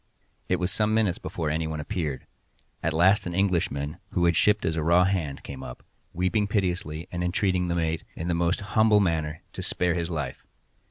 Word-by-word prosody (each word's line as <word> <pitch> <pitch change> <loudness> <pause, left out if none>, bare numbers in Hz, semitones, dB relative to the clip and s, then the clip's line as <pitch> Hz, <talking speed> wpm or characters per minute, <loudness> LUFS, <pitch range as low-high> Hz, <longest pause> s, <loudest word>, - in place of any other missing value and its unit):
It - - +3
was 90 0 -1
some 105 +3 +1
minutes 105 -5 +2
before 80 -3 -3
any 80 +1 -1
one 80 -1 -4
appeared:—at 75 +1 -5
last 90 +5 +4
an 85 - -4
Englishman, 85 -6 0 0.2
who 85 - +2
had 85 -1 +3
shipped 105 +4 +3
as 80 - 0
a 80 - -1
raw 85 +3 +5
hand, 90 -7 -1
came 65 -1 -7
up, - - -9 0.3
weeping 95 +4 +1
piteously, 90 -5 -1
and 90 0 -2
entreating 90 0 +1
the 85 - 0
mate, 80 -1 -1
in 85 - -4
the 90 - +1
most 85 +3 +1
humble 110 -1 +5
manner, 80 -5 -1
to - - -5
spare 90 -1 0
his 85 -1 -2
life. 75 -6 -4
85 Hz, 195 wpm, -26 LUFS, 80-95 Hz, 0.3 s, raw